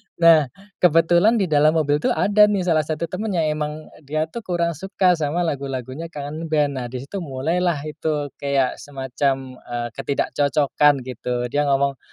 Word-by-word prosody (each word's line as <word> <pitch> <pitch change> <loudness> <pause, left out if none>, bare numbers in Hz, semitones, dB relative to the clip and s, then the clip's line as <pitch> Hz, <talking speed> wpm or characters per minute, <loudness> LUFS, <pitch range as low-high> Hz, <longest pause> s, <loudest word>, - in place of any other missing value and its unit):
Nah, 165 -4 +6 0.3
kebetulan 175 +6 +4
di 205 - +2
dalam 155 -1 +3
mobil 145 -2 +2
tuh - - 0
ada 210 +1 +5
nih 200 -3 0
salah 155 -4 +1
satu 155 +1 -3
teman 185 +4 -3
yang 155 -2 +1
emang 150 0 -5 0.2
dia 155 +1 0
tuh 235 - -5
kurang 170 -1 0
suka 185 +3 +1
sama 165 +1 0
lagu-lagunya 140 0 -4
Kangen 155 +1 -6
Band. 150 -2 +1
Nah, 120 - -4
di 125 +1 -6
situ 195 +7 -6
mulailah 160 +2 -1
itu 150 -1 -3
kayak 140 -2 0
semacam, 135 -1 -3
eee, 120 0 -4
ketidakcocokan, 145 +1 +1
gitu. 125 -1 -4
Dia 145 0 +1
ngomong, 140 -1 +1
150 Hz, 165 wpm, -22 LUFS, 140-170 Hz, 0.3 s, Nah